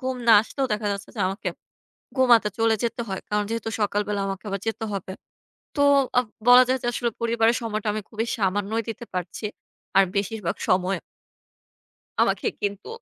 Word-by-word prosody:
ঘুম 260 -1 -2
না 230 - +8
আসলেও 270 +4 -2
দেখা 210 0 -1
যাচ্ছে 200 0 -6
যে - - -3
আমাকে 195 +3 -3 0.7
ঘুমাতে 235 -5 +5
চলে 225 -1 +3
যেতে 235 0 -1
হয়। 190 - -3
কারণ 210 0 +1
যেহেতু 230 0 -2
সকাল 205 0 +1
বেলা 205 -1 -1
আমাকে 195 +1 -5
আবার 195 -1 -3
যেতে 225 0 -2
হবে। 190 -1 -4 0.7
তো 285 - +3 0.3
অ্যাঁ 250 0 +4 0.2
বলা 250 +1 +10
যায় 260 0 +2
যে, - - -3
আসলে 240 0 -1
পরিবারের 230 0 +2
সময়টা 215 -1 -2
আমি 215 0 -3
খুবই 225 +1 -3
সামান্যই 205 +2 0
দিতে 225 - -7
পারছি। 180 +4 -3 0.5
আর 195 - +8
বেশিরভাগ 200 -1 -1
সময় 185 +1 +2 1.2
আমাকে - - +2
কিন্তু 205 0 -3
215 Hz, 170 wpm, -24 LUFS, 200-230 Hz, 1.2 s, বলা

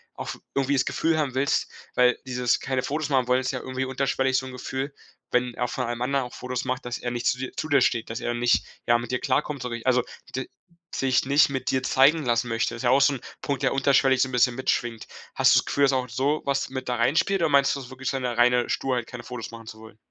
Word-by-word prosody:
auch - - -6
f - - -18
irgendwie 140 +1 +1
das 130 -2 +3
Gefühl 165 -1 0
haben 145 -5 -1
willst, 135 +1 0 0.2
weil 125 0 +4
dieses 125 -1 +1
keine 130 -1 -2
Fotos 150 +2 -2
machen 130 -3 +2
wollen, 125 +1 +4
ist 130 - -2
ja - - -3
irgendwie 130 0 -3
unterschwellig, 130 0 0
so 130 - -2
'n 130 - -7
Gefühl, 130 +2 -4 0.4
wenn 125 0 +1
er 125 +1 -2
von 125 - -2
allem 120 0 -4
anderen 135 +1 0
auch 125 - -10
Fotos 125 0 -4
macht, 130 -1 -3
dass 120 - -3
er 120 - -4
nicht 120 0 -4
zu 125 - +2
dir 130 0 -5
zu 155 - -4
dir 140 - +5
steht, 115 -2 +1
dass 115 +1 -4
er 120 - -2
nicht, 120 0 +2 0.2
ja, 120 0 +4
mit 120 +1 -6
dir 125 - 0
klarkommt, 140 +1 -1
so 125 -1 -4
wie 115 +1 -6
also 125 -1 +3 0.3
d 130 - -4 0.4
sich 130 -2 +1
nicht 140 +1 +4
mit 130 -1 -3
dir 130 -1 0
zeigen 145 +4 +4
lassen 120 0 +1
möchte. 115 0 -1
Ist 115 - -7
ja 120 - +3
auch 135 +2 +5
so 140 +1 +5
'n 125 - -6 0.2
Punkt, 140 -2 -2
der - - +2
unterschwellig 135 -1 +3
so - - +3
'n 130 - -9
bisschen 125 0 +3
mitschwingt. 120 -3 -2 0.3
Hast - - +5
du's - - +4
Gefühl, 140 - 0
dass 135 -1 +4
auch 125 -2 -1
sowas 135 +2 0
mit 130 -1 -5
da 125 - 0
reinspielt, 170 +11 +2
oder 165 - +2
meinst 140 -1 +4
du - - -5
so 125 - -10
wirklich 130 -1 -4
so 135 - -1
'ne 120 -2 -3
reine 125 0 +4
Sturheit 125 -3 -1
keine 125 -1 -8
Fotos 125 -3 -7
machen 115 -1 -11
zu 110 - -9
wollen? 110 -1 -14
130 Hz, 265 wpm, -25 LUFS, 120-135 Hz, 0.4 s, dir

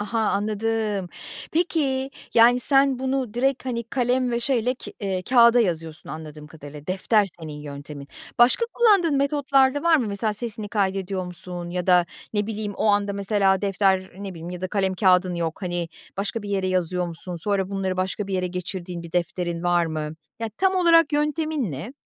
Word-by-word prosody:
Aha. 225 +2 -2
Anladım. 215 -2 -1 0.4
Peki 275 -6 0 0.2
yani 240 +2 +6
sen 270 -1 +3
bunu 260 -3 -2
direkt 265 +2 0
hani 235 -3 -3
kalem 250 +1 0
ve 235 0 -1
şeyle 250 -1 +1
ke - - -10
eee, 190 -3 -2
kağıda 240 +1 +6
yazıyorsun 165 -4 -2
anladığım 155 -1 -8
kadarıyla. 150 -1 -11
Defter 195 +3 +2
senin 150 -2 -7
yöntemin. 145 0 -8 0.3
Başka 245 - +5
kullandığın 395 -10 +4
metotlar 275 -1 +3
da 290 - -3
var 335 -1 +5
mı? 245 -6 0
Mesela 210 +1 -1
sesini 215 -2 -5
kaydediyor 195 -2 -1
musun 175 -1 -6
ya 180 0 -3
da 180 -2 +5 0.3
ne 205 -1 0
bileyim 210 -2 -4
o - - -1
anda 205 -1 +2
mesela 195 -1 +1
defter 190 -1 +1
ne 200 -1 -5
bileyim 165 +1 -7
ya 180 0 -6
da 185 - -3
kalem 190 -2 0
kağıdın 185 -2 +3
yok 170 +2 -3
hani 175 -2 -2 0.3
başka 205 +3 -2
bir 205 - -7
yere 195 -2 0
yazıyor 180 -1 0
musun? 170 +1 -6
Sonra 195 +2 -1
bunları 190 -1 -2
başka 190 +2 -2
bir 195 - -3
yere 180 -1 0
geçirdiğin 180 -1 -5
bir 170 - -11
defterin 175 -1 -2
var 175 -1 +2
mı? 155 -1 -4 0.3
Ya 225 - -2
tam 380 0 +2
olarak 335 -3 +5
yöntemin 300 - 0
ne? 150 - -6
200 Hz, 180 wpm, -24 LUFS, 180-245 Hz, 0.4 s, yani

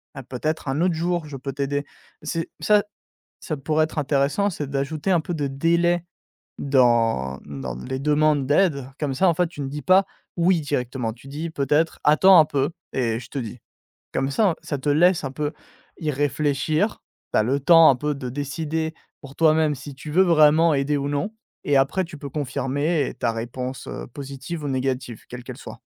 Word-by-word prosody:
mais 135 - -6
peut-être 145 +5 -3
un 135 +3 -1
autre 180 -1 +2
jour, 175 0 -1
je 145 -2 -7
peux 135 +2 -5
t'aider». 140 +1 -2 0.4
C'est 165 +2 -3
ça 210 -1 +4 0.6
ça 155 - -3
pourrait 155 +3 +1
être 160 - -7
intéressant, 145 +8 +1
c'est 150 -6 -5
d'ajouter 140 +6 -2
un 175 - +4
peu 165 - -5
de 150 -4 -1
délai 170 +5 +1 0.6
dans 115 - +2
dans 70 -4 -6
les 130 - -5
demandes 150 -1 +2
d'aide, 145 -4 +2
comme 145 -3 -1
ça, 180 +7 +3
en 165 - +1
fait, 180 - +2
tu 155 -3 -9
ne 135 - -3
dis 150 +1 -5
pas: 185 +7 +5 0.3
«Oui», 170 -1 +3
directement, 125 -5 -2
tu 115 +3 -16
dis, 155 +4 -5
peut-être: 150 +2 +1
«Attends 180 +5 +7
un 155 - +6
peu 140 0 -1 0.2
et 115 -3 0
je 120 - -12
te 140 - -7
dis», 120 0 -6 0.5
comme 135 - 0
ça 205 +6 +3
en 165 - -1
ça 145 - -3
te 140 +2 -2
laisse 170 +3 +4
un 135 - -3
peu 145 +2 -2 0.5
y 155 -2 -1
réfléchir, 145 +6 0 0.3
tu - - +4
as 110 - +3
le 135 +5 +1
temps 165 +3 +7
un 135 - +5
peu 150 +4 -2
de 130 -2 -5
décider 160 +4 -3 0.3
pour 140 -1 -12
toi-même 155 -2 +3
si 140 +1 -9
tu 150 +3 -8
veux 180 - +4
vraiment 160 -1 +5
aider 140 +2 0
ou 140 0 -2
non, 145 +9 -2 0.3
et 145 - +2
après 135 +8 +2
tu 165 -2 -10
peux 140 - -6
confirmer, 145 +2 -1
ta 115 - +1
réponse, 125 +3 -5
heu, - - -6
positive 140 - -7
ou 145 - -2
négative 130 -3 -2
quelle 125 0 -8
qu'elle - - -8
soit. - - -10
145 Hz, 200 wpm, -23 LUFS, 135-160 Hz, 0.6 s, Attends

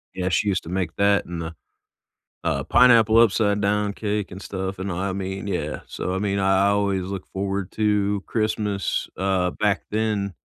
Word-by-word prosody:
Yeah, 90 0 -1
she 100 +4 +1
used 95 -1 0
to - - -9
make 90 -2 -2
that, 100 0 +3
and 85 -1 -5
the, 80 0 -5 0.9
uh, - - 0
pineapple 115 -3 +6
upside-down 105 -2 +2
cake, 105 -1 -2
and 95 - -8
stuff, 95 0 -4
and 95 +1 -3
I 95 +2 -2
I - - -2
mean, 95 +1 -4
yeah. 90 -6 -3
So, 90 - -4
I 95 - -1
mean, 100 0 -1
I 95 0 +3
I - - +4
always 100 -2 +1
look 95 0 -6
forward 95 -1 -3
to 105 -2 +1
Christmas, 105 -3 -1
uh, 95 -1 +1
back 105 -2 0
then. 105 -3 -1
100 Hz, 185 wpm, -23 LUFS, 95-105 Hz, 0.9 s, pineapple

